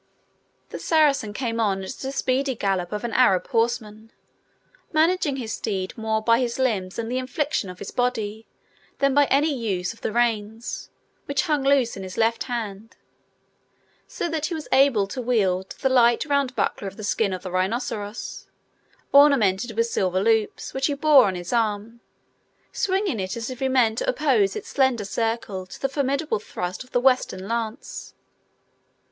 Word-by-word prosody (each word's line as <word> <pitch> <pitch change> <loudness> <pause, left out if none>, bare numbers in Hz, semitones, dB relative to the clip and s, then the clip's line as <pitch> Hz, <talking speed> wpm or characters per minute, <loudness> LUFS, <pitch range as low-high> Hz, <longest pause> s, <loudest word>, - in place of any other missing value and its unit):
The - - -7
Saracen 290 -9 +2
came 230 +1 -3
on 195 -3 +1
at 190 - -5
the 265 +1 -5
speedy 270 0 0
gallop 190 -4 -1
of 210 +1 -4
an 235 -2 -3
Arab 195 -7 +3
horseman, 225 -1 -1 0.8
managing 320 -2 +2
his 230 -5 -4
steed 190 -3 -3
more 220 -2 -1
by 230 +1 +4
his 240 -2 -1
limbs 210 -8 -1
and 230 0 -3
the 255 - 0
inflection 260 -4 -2
of 180 - -9
his 200 - -7
body 225 -3 -2 0.5
than 275 -1 +2
by 290 +1 +5
any 290 +3 +2
use 200 -7 -2
of 230 - -21
the - - -2
reins, 225 -1 -1 0.4
which 280 +2 0
hung 300 -5 +1
loose 270 -4 +3
in 195 - -7
his 185 -1 -8
left 230 0 +1
hand; 225 -3 -5 1.1
so - - -3
that 320 -2 -2
he 345 - -3
was 310 - -6
enabled 260 -7 +4
to 260 - -3
wield 195 -6 +1
the 270 - +3
light, 240 -2 +4
round 280 -3 0
buckler 200 - -1
of 195 - -8
the 215 - -8
skin 205 0 0
of 185 -1 -5
the 185 - -6
rhinoceros, 205 +3 -3 0.7
ornamented 235 -7 +4
with 230 - +3
silver 185 -5 0
loops, 220 +1 0
which 265 0 0
he 290 - -1
wore 290 -2 +6
on 190 -2 -1
his 175 +5 -5
arm, 225 0 -1 0.7
swinging 380 - 0
it 190 +3 -3
as 230 +2 -4
if 255 - -8
he 265 - +1
meant 240 -4 +3
to - - -1
oppose 245 -9 +2
its - - -6
slender 260 -6 +1
circle 210 -3 -2
to - - -11
the 270 - 0
formidable 280 -1 -1
thrust 180 0 -5
of 255 - -21
the 245 - +2
Western 250 -7 +1
lance. 230 +3 -4
230 Hz, 175 wpm, -24 LUFS, 205-265 Hz, 1.1 s, wore